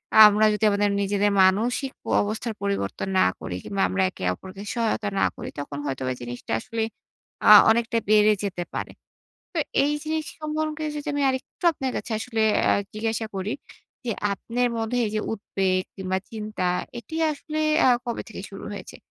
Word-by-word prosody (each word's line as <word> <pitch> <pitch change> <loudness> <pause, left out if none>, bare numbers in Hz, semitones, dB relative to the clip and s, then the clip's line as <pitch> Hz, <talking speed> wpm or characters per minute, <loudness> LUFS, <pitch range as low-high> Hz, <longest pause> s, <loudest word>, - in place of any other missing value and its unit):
আ - - +5
আমরা 210 +1 +3
যদি 210 - -3
আমাদের 205 0 +2
নিজেদের 205 +1 +2
মানসিক 235 +8 +2
প - - -56 0.2
অবস্থার 220 +2 -3
পরিবর্তন 100 - -2
না 95 - +5
করি 90 - -5
কিংবা 195 -1 -2
আমরা 190 0 +1
একে 185 - -10
অপরকে 190 - -10
সহায়তা 225 -3 0
না - - +4
করি, - - -6
তখন 145 0 -5
হয়তোবা 130 -2 -2
জিনিসটা 120 0 -7
আসলে 225 - -3 0.6
আ - - +8 0.2
অনেকটা 230 +1 +2
বেড়ে 215 0 +6
যেতে 180 -3 -2
পারে। - - -4 0.6
তো - - -1 0.3
এই 295 - +1
জিনিস 315 0 -1 0.2
সম্পর্কে 310 0 -2
যদি 295 - -6
আমি 285 - 0
আরেকটু 260 +6 -4
আপনার 265 -4 -3
কাছে - - -5
আসলে 225 -1 -3 0.2
অ্যা - - +4 0.2
জিজ্ঞাসা 220 +1 -1
করি 195 +3 -2 0.5
যে, 235 - -1 0.2
আপনের 245 +4 -1
মধ্যে 225 +2 -1
এই - - -3
যে 215 - +1
উদ্বেগ 190 -3 0
কিংবা 190 0 -1
চিন্তা, 215 -4 -3 0.3
এটি 235 +8 -9 0.2
আসলে 305 +1 -5 0.3
আ - - +6 0.2
কবে 235 - -2
থেকে 220 - -8
শুরু 195 +1 -9
হয়েছে? 200 -3 -8
215 Hz, 175 wpm, -25 LUFS, 195-240 Hz, 0.6 s, আ